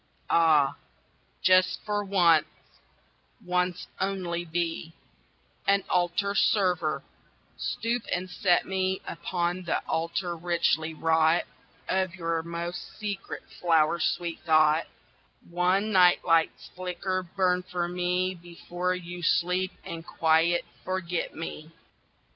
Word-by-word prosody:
Ah, 155 -4 +4 0.7
just 185 0 +5
for 205 -1 -1
once, 170 -6 +4 1.0
once 180 0 0
only, 185 -3 -2
be 165 -1 -3 0.7
An 200 -1 +3
altar 180 +3 +1
server 180 -7 +2 0.5
stoop 235 +1 -2
and 180 +1 -1
set 180 -1 +2
me 190 0 -1
Upon 175 +1 -2
the 170 - +1
altar 170 +2 -1
richly 165 -1 0
wrought 160 +1 +3 0.4
Of 190 -1 0
your 165 -2 -1
most 170 +1 -6
secret 205 -2 -5 0.2
flower 165 -1 +3
sweet 165 +2 -1
thought: 155 0 +4 0.6
One 180 +5 +1
nightlight's 175 -3 +3
flicker 185 +1 -2
burn 180 0 0
for 180 -1 -3
me 180 +1 0
Before 175 +1 -4
you 175 0 -7
sleep 180 +2 +1
and 165 -3 -6
quite 165 +1 +2 0.2
forget 185 -2 -3
me. 160 -1 -6
175 Hz, 105 wpm, -27 LUFS, 165-185 Hz, 1.0 s, just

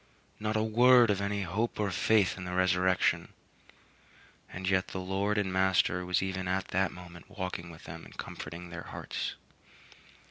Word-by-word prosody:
Not 110 0 -1
a 110 - +2
word 120 +1 +6
of 100 -1 0
any 100 0 -1
hope 100 +8 -2
or 100 -2 0
faith 105 +1 +3
in 90 - -7
the 90 0 -5
resurrection! 90 0 +2 1.2
And 95 +1 -5
yet 95 0 +2
their 95 - -5
Lord 100 +3 0
and 95 -3 0
Master 95 -1 +2
was 90 +1 +2
even 95 -1 -3
at 95 +1 -1
that 95 +1 +1
moment 90 -1 -12
walking 90 -3 -5
with 80 -1 -12
them 80 0 -9
and - - -14
comforting 85 +2 -7
their 85 0 -6
hearts. - - -4
95 Hz, 170 wpm, -30 LUFS, 90-100 Hz, 1.2 s, word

